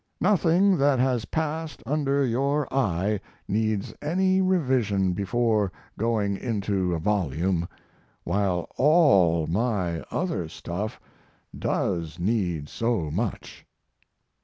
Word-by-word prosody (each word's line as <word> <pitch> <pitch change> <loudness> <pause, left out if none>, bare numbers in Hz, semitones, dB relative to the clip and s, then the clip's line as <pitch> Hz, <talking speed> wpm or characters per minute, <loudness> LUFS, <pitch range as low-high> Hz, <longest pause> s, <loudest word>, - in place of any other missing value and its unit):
Nothing 185 -1 +3
that 140 -1 +3
has 125 -3 +1
passed 160 0 -3
under 140 0 +1
your 140 +4 0
eye 105 -5 +1 0.3
needs 110 -1 -1
any 185 +5 +2
revision 130 - +1
before 105 +1 +1 0.2
going 105 -3 0
into 100 -6 -1
a - - -1
volume, 85 -1 0 0.6
while 95 -4 0
all 125 - +4
my 95 -3 -1
other 95 - -2
stuff 90 +6 -5 0.6
does 85 -3 -2
need 90 -6 -1
so 110 -6 -1
much. 105 +6 -4
110 Hz, 100 wpm, -26 LUFS, 90-140 Hz, 0.6 s, all